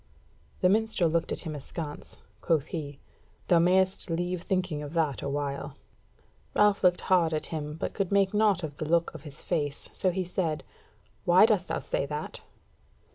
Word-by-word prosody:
The 180 - +5
minstrel 210 -5 +2
looked 165 0 0
at - - -2
him 160 -3 -5
askance; 150 +1 -7 0.2
quoth 160 -5 +1
he: 145 -4 -4 0.5
"Thou 175 - +6
mayst 185 +2 +2
leave 175 +1 -1
thinking 185 -5 -1
of 145 +1 -7
that 160 -5 0
awhile." 140 0 -3 0.8
Ralph 210 -1 +4
looked 180 -1 +4
hard 170 -4 +3
at 155 - -2
him, 150 -1 -4
but 160 - -4
could 195 -3 -2
make 200 -1 +3
naught 210 -4 +3
of 145 -2 -5
the 155 - -4
look 170 0 +2
of - - -9
his 150 -2 -9
face; 145 -5 -2
so 185 - +1
he 185 +1 -1
said: 170 -3 -2 0.6
"Why - - +7
dost - - +2
thou - - -1
say - - -2
that?" - - -5
170 Hz, 175 wpm, -28 LUFS, 150-185 Hz, 0.8 s, Why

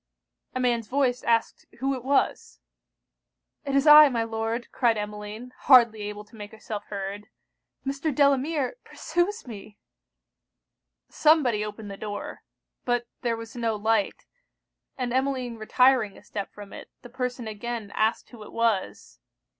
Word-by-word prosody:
A - - -1
man's 240 -3 0
voice 255 -1 +1
asked 230 -1 0
who 270 +3 0
it 255 -3 -5
was? 275 +1 0 1.1
'It 275 -1 -1
is 275 +1 +3
I, 300 -1 +10
my 235 -3 0
Lord,' 225 +1 -3
cried 235 -4 +2
Emmeline, 210 +3 -6
hardly 235 -5 +6
able 210 0 -6
to 225 - -19
make 205 -1 -8
herself 215 -1 -7
heard. 200 +1 -6 0.6
'Mr. 275 +3 -1
Delamere 280 - +1
pursues 350 +6 -2
me.' 210 -3 -10 1.3
Somebody 280 -9 +3
opened 210 -1 -7
the 195 - -8
door. 205 0 -6 0.4
But 245 -1 0 0.2
there 235 -2 -1
was 230 +1 -9
no 230 -2 -1
light; 215 -1 0 0.7
and 250 -2 -2
Emmeline 260 -3 -1
retiring 240 -1 +3
a - - -16
step 205 -1 -6
from 205 -1 -11
it, - - -10
the 245 - -11
person 250 -2 -4
again 220 0 -5
asked 220 +1 0
who 235 -3 -12
it 210 - -11
was? 230 -4 -1
235 Hz, 145 wpm, -26 LUFS, 210-260 Hz, 1.3 s, I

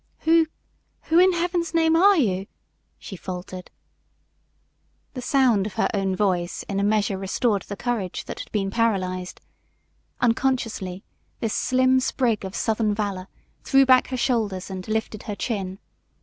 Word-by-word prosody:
"Who 325 0 +4 0.6
who 325 +2 +3
in 370 +1 +6
heaven's 340 -1 -1
name 325 0 +4
are 390 +3 +6
you?" 195 - 0 0.5
she 195 - -9
faltered. 180 0 -7 1.4
The 255 - -5
sound 245 -6 +2
of 200 - -9
her 225 - +1
own 195 -2 0
voice 180 -3 -1
in 200 -1 -3
a - - +1
measure 205 -2 +1
restored 200 +2 0
the 200 - -5
courage 210 -5 -3
that - - -7
had - - -8
been 195 -2 -1
paralyzed. 185 -5 -1 0.8
Unconsciously 230 -6 0 0.4
this 225 -3 -2
slim 255 0 +3
sprig 245 -4 0
of 190 0 -6
southern 220 -2 0
valor 200 -3 -3 0.4
threw 270 0 +4
back 255 -1 +5
her 260 - -3
shoulders 215 -7 -1
and 185 -1 -6
lifted 215 -1 -2
her 205 - -2
chin. 195 -5 -3
215 Hz, 150 wpm, -24 LUFS, 195-255 Hz, 1.4 s, in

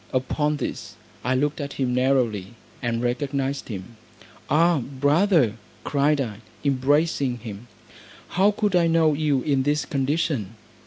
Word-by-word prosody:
Upon 150 +3 0
this - - -5 0.3
I 130 +2 +1
looked 145 +3 0
at 140 0 -5
him 130 -2 -1
narrowly, 125 -5 +1 0.3
and 120 -1 -1
recognised 135 +2 -1
him: 105 +1 -8 0.5
"Ah, 165 +2 +4
brother," 145 - +2 0.3
cried 145 +1 +2
I, 115 -7 -3 0.3
embracing 140 -1 +1
him, 110 0 -9 0.6
"how 190 +3 +3
could 205 -2 0
I 170 -1 +4
know 165 -2 +3
you 145 -3 +1
in 140 -3 +2
this 145 +2 0
condition?" 135 - -1
140 Hz, 135 wpm, -24 LUFS, 125-150 Hz, 0.6 s, Ah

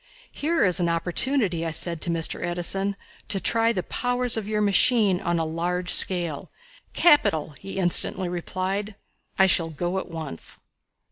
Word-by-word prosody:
"Here 325 +3 0
is 185 0 +3
an 170 -1 +1
opportunity," 180 +2 0
I 165 - -2
said 165 +1 -2
to - - -4
Mr. 165 -1 -1
Edison, 195 +3 -1 0.3
"to 200 - -1
try 230 +3 +2
the 185 -6 -3
powers 245 +2 0
of 220 -3 -4
your 215 0 -1
machine 205 -1 +3
on 170 0 -1
a 165 - -1
large 175 +3 -2
scale." 175 -6 -1 0.4
"Capital!" 290 - +3
he 195 - -8
instantly 185 0 +4
replied. 185 +4 -4 0.4
"I 190 - +5
shall 170 -3 +2
go 175 +4 -3
at 190 - -8
once." 160 - -4
180 Hz, 155 wpm, -24 LUFS, 170-210 Hz, 0.4 s, I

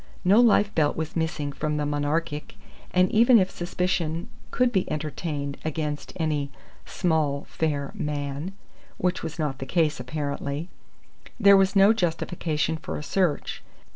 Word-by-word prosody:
No 200 +5 +6
life 210 -3 +4
belt 150 -2 +1
was 160 0 -4
missing 160 -3 -1
from 150 +2 -2
the 150 - 0
Monarchic 150 +1 -2 0.3
and 185 0 +3
even 235 +2 +6
if 190 -3 +2
suspicion 175 -2 -2 0.2
could 250 -1 +2
be 190 -5 0
entertained 150 -2 -3
against 150 -1 -3
any 150 -4 -1 0.4
"small, 155 -5 0
fair 145 -3 -2
man" 145 +4 -3 0.4
(which 180 0 0
was 165 0 -5
not 145 -4 -2
the 135 - -4
case, 155 -2 +1
apparently), 140 +4 -4 0.7
there 200 -2 +8
was 195 0 +3
no 200 +2 +7
justification 165 -4 -1
for - - -5
a - - -6
search. 175 -4 0
160 Hz, 140 wpm, -26 LUFS, 145-180 Hz, 0.7 s, there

